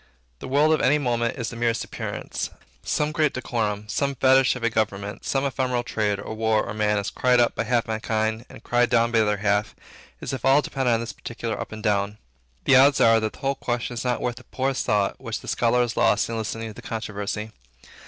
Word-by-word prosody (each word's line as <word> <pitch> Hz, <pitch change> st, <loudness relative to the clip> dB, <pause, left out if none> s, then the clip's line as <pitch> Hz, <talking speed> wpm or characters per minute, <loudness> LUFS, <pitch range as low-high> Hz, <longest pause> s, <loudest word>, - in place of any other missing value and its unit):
The -, -, -7 dB
world 145 Hz, +4 st, +3 dB
of 155 Hz, -, +1 dB
any 145 Hz, +3 st, +4 dB
moment 120 Hz, -4 st, -1 dB
is 120 Hz, -3 st, -3 dB
the -, -, -8 dB
merest 115 Hz, -1 st, 0 dB
appearance. -, -, -5 dB, 0.3 s
Some 150 Hz, 0 st, 0 dB
great 155 Hz, -2 st, +1 dB
decorum, 105 Hz, -4 st, -2 dB
some 140 Hz, +5 st, -1 dB
fetish 130 Hz, 0 st, +4 dB
of 125 Hz, -, -7 dB
a 115 Hz, -, +3 dB
government, 100 Hz, -2 st, -2 dB
some 135 Hz, 0 st, 0 dB
ephemeral 130 Hz, -2 st, -1 dB
trade, 105 Hz, -4 st, -1 dB
or 100 Hz, -, -6 dB
war, 110 Hz, -1 st, +1 dB
or -, -, -5 dB
man, 105 Hz, -1 st, +1 dB
is 100 Hz, -, -2 dB
cried 125 Hz, -1 st, +3 dB
up 120 Hz, -, +3 dB
by 115 Hz, -, -2 dB
half 120 Hz, 0 st, +1 dB
mankind 110 Hz, +1 st, -1 dB
and -, -, -13 dB
cried 120 Hz, 0 st, +2 dB
down 115 Hz, 0 st, +3 dB
by 115 Hz, -, +3 dB
the 110 Hz, -, +4 dB
other 105 Hz, 0 st, +1 dB
half, 100 Hz, 0 st, 0 dB, 0.4 s
as -, -, -5 dB
if 135 Hz, -, -5 dB
all 135 Hz, +2 st, +5 dB
depended 130 Hz, -3 st, 0 dB
on 115 Hz, -, -1 dB
this 115 Hz, -, -5 dB
particular 115 Hz, -1 st, -5 dB
up -, -, -7 dB
or -, -, -6 dB
down. 105 Hz, -1 st, 0 dB, 0.5 s
The 135 Hz, -, +6 dB
odds 140 Hz, +1 st, +6 dB
are 115 Hz, 0 st, +6 dB
that 110 Hz, -1 st, -2 dB
the -, -, -15 dB
whole 135 Hz, 0 st, +1 dB
question 120 Hz, -2 st, -3 dB
is 115 Hz, -, -4 dB
not 125 Hz, -1 st, -1 dB
worth 120 Hz, -1 st, -2 dB
the 125 Hz, -, -11 dB
poorest 135 Hz, 0 st, -2 dB
thought 100 Hz, -2 st, +1 dB
which -, -, -4 dB
the -, -, -12 dB
scholar 120 Hz, +1 st, +2 dB
has 120 Hz, -1 st, -1 dB
lost -, -, +2 dB
in 115 Hz, -, -3 dB
listening 115 Hz, 0 st, -4 dB
to -, -, -9 dB
the -, -, -11 dB
controversy. 110 Hz, -1 st, -4 dB
115 Hz, 230 wpm, -24 LUFS, 110-130 Hz, 0.5 s, The